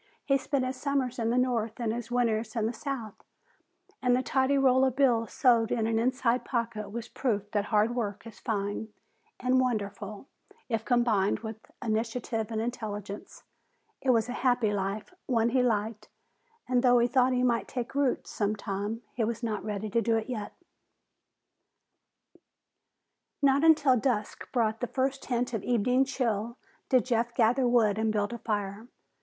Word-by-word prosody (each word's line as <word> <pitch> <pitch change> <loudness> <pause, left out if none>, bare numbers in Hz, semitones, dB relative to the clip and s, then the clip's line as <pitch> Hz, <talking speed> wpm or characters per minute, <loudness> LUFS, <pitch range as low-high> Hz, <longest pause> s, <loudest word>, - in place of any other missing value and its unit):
He 275 -1 +3
spent 270 -1 -1
his 255 0 -3
summers 270 -4 -1
in 225 -1 0
the 240 - +1
north 235 -3 0
and 225 -2 0
his 235 0 -5
winters 230 -2 0
in 225 -2 0
the 225 - -1
south, 240 -4 -6 0.8
and 250 -2 +3
the 255 - 0
tidy 265 +1 +2
roll 260 -1 +4
of 260 -2 +2
bills 240 -5 +2
sewed 235 -3 +3
in 225 -2 +1
an 225 0 +1
inside 250 0 +1
pocket 230 -4 -3
was 235 +2 -5
proof 210 -7 -2
that 205 -1 0
hard 215 +2 +2
work 210 -3 -3
is 225 -4 -11
fine 205 -1 -2 0.5
and 255 +1 +2
wonderful 210 -2 -3 0.4
if 225 -3 -1
combined 230 -5 +2
with 220 -1 -6 0.3
initiative 225 0 -2
and 220 -1 -2
intelligence. 210 -3 -5 0.6
It 265 - -1
was 230 -2 +4
a - - -4
happy 245 -4 +1
life, 205 - -3
one 230 -2 +2
he 255 +1 +2
liked, 215 -2 -1 0.6
and 250 -1 +2
though 245 -1 +5
he 240 0 +4
thought 255 +1 +3
he 250 0 +1
might 235 -2 +1
take 245 -1 -4
roots 280 -2 0
some 210 0 0
time, 205 +3 -4
he 235 - -1
was 230 +2 -2
not 220 -2 -2
ready 210 0 -4
to 230 - +2
do 230 -1 +2
it 220 - -3
yet. 215 -5 -5 2.9
Not 280 +1 +4
until 300 -5 +6
dusk 220 -4 -2
brought 225 -3 +1
the 245 - -2
first 265 +2 -1
hint 245 -1 -1
of 220 - -1
evening 250 +3 +2
chill 235 -3 -2 0.3
did 255 -4 +4
Jeff 235 -1 0
gather 245 +2 +3
wood 220 -4 +3
and 220 0 +1
build 210 +1 -1
a 235 - -6
fire. 205 0 -3
235 Hz, 170 wpm, -29 LUFS, 215-250 Hz, 2.9 s, until